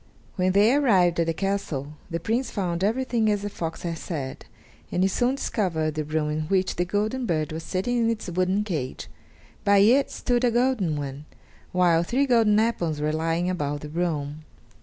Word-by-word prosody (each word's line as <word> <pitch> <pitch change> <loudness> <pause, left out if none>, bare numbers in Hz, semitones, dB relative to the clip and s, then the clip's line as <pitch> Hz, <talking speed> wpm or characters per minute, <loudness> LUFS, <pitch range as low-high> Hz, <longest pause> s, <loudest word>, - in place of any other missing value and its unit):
When 185 -1 +1
they 210 +5 +5
arrived 190 - +3
at 165 - +2
the 165 - +1
castle, 165 -8 -2 0.2
the 170 -1 -2
Prince 230 +9 -1
found 180 -3 -2
everything 230 0 +1
as 205 -1 0
the 205 - -3
fox 165 -4 -5
had 165 -2 -3
said, 140 -6 -5 0.4
and 180 - +1
he - - +4
soon 245 +6 +1
discovered 165 - -1
the 155 0 -2
room 150 0 -1
in 155 +1 -1
which 190 +1 0
the 175 - +1
golden 215 +7 -1
bird 155 -3 -1
was 160 +1 -4
sitting 195 +9 -1
in 230 -1 +2
its 225 -1 -3
wooden 185 +3 +1
cage; 155 -11 -4 0.6
by 200 0 +4
it 240 +8 +5
stood 245 -1 -1
a 245 - +4
golden 235 - +1
one; 140 0 -6 0.5
while 175 -2 +3
three 250 +11 +1
golden 225 -5 +4
apples 175 -9 0
were 150 +1 0
lying 165 +2 0
about 145 -5 -2
the 150 - -7
room. 155 -2 -2
180 Hz, 190 wpm, -25 LUFS, 160-220 Hz, 0.6 s, they